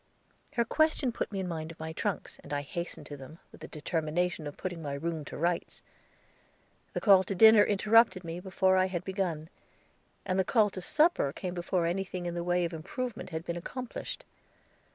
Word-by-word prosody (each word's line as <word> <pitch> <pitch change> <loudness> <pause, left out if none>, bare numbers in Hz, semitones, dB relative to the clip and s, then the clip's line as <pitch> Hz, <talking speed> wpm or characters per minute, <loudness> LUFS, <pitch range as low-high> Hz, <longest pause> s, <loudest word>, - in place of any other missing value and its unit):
Her 235 - +2
question 310 -1 +2
put 230 - -3
me 195 - -3
in 190 - -2
mind 160 -2 -4
of 165 - -14
my 160 0 -5
trunks, - - -3
and 145 - -13
I 145 0 0
hastened 170 +4 -5
to 145 - -8
them, 135 +4 -11
with - - -15
the - - -7
determination 160 +1 -2
of 145 - -8
putting 175 -3 -4
my 145 -2 -3
room 160 +1 -3
to - - -7
rights. 170 +2 -1 1.1
The - - -1
call 195 -3 +6
to 195 - -3
dinner 220 +1 +8
interrupted 210 -1 +4
me 165 +1 -5
before 190 0 +2
I 185 0 +4
had 180 -2 -3
begun, 180 -5 -2 0.8
and 185 -1 0
the - - +4
call 210 +1 +3
to 185 - -6
supper 300 - +3
came 180 +4 -5
before 175 0 0
anything 180 +1 -2
in 175 - -2
the 170 0 -3
way 175 0 +1
of 170 - -4
improvement 210 +10 -5
had 160 -1 -5
been 170 - -3
accomplished. 250 +8 -6
180 Hz, 195 wpm, -30 LUFS, 165-195 Hz, 1.1 s, dinner